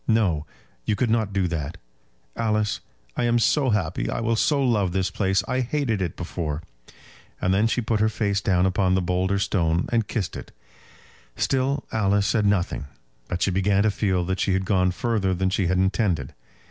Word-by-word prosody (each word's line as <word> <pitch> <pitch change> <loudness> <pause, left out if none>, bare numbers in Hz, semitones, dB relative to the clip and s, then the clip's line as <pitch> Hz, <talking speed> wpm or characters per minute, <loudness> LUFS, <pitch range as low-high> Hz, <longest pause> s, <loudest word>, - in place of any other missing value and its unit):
No; 95 -10 +2 0.4
you 105 - 0
could 120 +1 0
not 110 -3 +1
do 95 -2 +1
that? 80 0 -4 0.6
Alice, 105 -2 0 0.4
I - - 0
am 120 0 +3
so 135 +3 +2
happy. 95 -7 0
I - - -2
will 115 0 +1
so 145 +5 +2
love 105 -9 +1
this 95 0 0
place. 95 -1 +1
I 130 0 0
hated 125 -5 -1
it 85 -4 -2
before." 85 -3 -4 0.8
And 90 - +1
then 105 +4 +3
she 125 - 0
put 110 -1 0
her 110 +1 +3
face 100 -2 -1
down 90 -2 +2
upon 95 0 +2
the 95 - +2
boulder 90 +2 0
stone 85 -3 +1
and 115 -3 +1
kissed 100 -6 -3
it. - - -8 0.8
Still 135 +1 0
Alice 100 -2 +2
said 105 -1 +2
nothing, 90 -7 0 0.4
but 90 0 -2
she 95 - +2
began 95 +2 +2
to 110 - +3
feel 95 -4 0
that 95 +1 -2
she 95 - +1
had 95 0 0
gone 95 -2 +2
further 100 -1 0
than 95 +1 0
she 95 -1 +1
had 95 +1 +1
intended. 95 - 0
100 Hz, 190 wpm, -24 LUFS, 90-110 Hz, 0.8 s, am